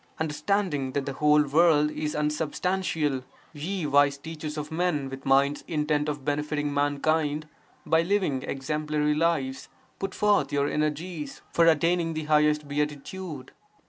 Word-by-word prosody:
Understanding 150 Hz, -2 st, -1 dB
that 140 Hz, -1 st, -1 dB
the 140 Hz, -, -3 dB
whole 150 Hz, +2 st, +4 dB
world 150 Hz, 0 st, +4 dB
is 150 Hz, -1 st, -3 dB
unsubstantial, 150 Hz, -1 st, -1 dB, 0.3 s
ye 165 Hz, +4 st, -3 dB
wise 140 Hz, -1 st, +4 dB
teachers 155 Hz, 0 st, -7 dB
of 150 Hz, +1 st, -5 dB
men 160 Hz, -5 st, -1 dB
with 135 Hz, 0 st, -8 dB
minds 140 Hz, +2 st, +3 dB
intent 150 Hz, -1 st, 0 dB
on 145 Hz, -2 st, -4 dB
benefiting 145 Hz, 0 st, -1 dB
mankind 145 Hz, +1 st, 0 dB, 0.4 s
(by 160 Hz, +1 st, +3 dB
living 175 Hz, -7 st, 0 dB
exemplary 150 Hz, +2 st, -1 dB
lives), 150 Hz, -4 st, 0 dB, 0.3 s
put 195 Hz, -1 st, -4 dB
forth 205 Hz, -9 st, +2 dB
your 140 Hz, 0 st, +1 dB
energies 150 Hz, 0 st, -3 dB
(for 165 Hz, 0 st, +4 dB
attaining 165 Hz, +1 st, +2 dB
the 155 Hz, -, -2 dB
highest 150 Hz, 0 st, +2 dB
beatitude). 150 Hz, +1 st, -4 dB
150 Hz, 135 wpm, -27 LUFS, 145-160 Hz, 0.4 s, whole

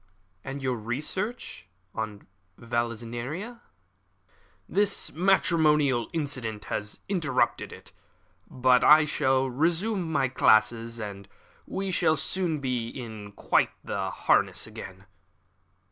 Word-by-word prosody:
"And 135 Hz, +1 st, -6 dB
your 130 Hz, -2 st, 0 dB
research 150 Hz, -, -4 dB, 0.3 s
on 110 Hz, -2 st, -5 dB, 0.3 s
Vallisneria?" 120 Hz, -, -4 dB, 1.1 s
"This 205 Hz, +1 st, 0 dB
matrimonial 155 Hz, -, +3 dB
incident 130 Hz, -9 st, -3 dB
has 105 Hz, 0 st, -4 dB
interrupted 175 Hz, -6 st, 0 dB
it, -, -, -13 dB, 0.6 s
but 125 Hz, -1 st, +3 dB
I 150 Hz, 0 st, +8 dB
have 130 Hz, -3 st, +1 dB
resumed 175 Hz, -, 0 dB
my 140 Hz, -4 st, +2 dB
classes, 115 Hz, -1 st, +3 dB
and 100 Hz, -2 st, -7 dB, 0.4 s
we 195 Hz, 0 st, -3 dB
shall 155 Hz, -3 st, +2 dB
soon 175 Hz, -5 st, -1 dB
be 115 Hz, -5 st, -4 dB
quite -, -, +2 dB, 0.2 s
in -, -, -7 dB, 0.2 s
harness -, -, +2 dB
again." 95 Hz, +1 st, -10 dB
130 Hz, 100 wpm, -27 LUFS, 115-165 Hz, 1.1 s, I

